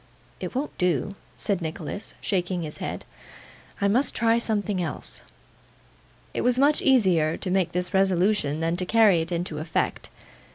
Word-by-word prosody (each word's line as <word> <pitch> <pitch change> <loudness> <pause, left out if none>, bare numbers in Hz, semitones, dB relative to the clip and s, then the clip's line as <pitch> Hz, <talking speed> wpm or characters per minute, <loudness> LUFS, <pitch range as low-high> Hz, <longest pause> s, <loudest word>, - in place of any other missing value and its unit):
'It - - -6
won't 280 +3 -3
do,' 180 +1 +1 0.2
said 200 -4 -1
Nicholas, 160 +4 -4
shaking 180 -2 -1
his 150 -1 -6
head; - - -5 0.7
'I 200 - +2
must 250 +7 +2
try 230 0 +3
something 205 -4 0
else.' 165 -4 -4 1.1
It - - -1
was 250 0 +3
much 285 +3 +4
easier 185 - +3
to 185 - -3
make 185 -3 +1
this 180 +2 -1
resolution 190 -5 +2
than 165 +1 0
to 185 - -1
carry 215 -6 +5
it 165 +2 -5
into 170 -3 -3
effect. 160 +1 -2
185 Hz, 155 wpm, -25 LUFS, 165-215 Hz, 1.1 s, carry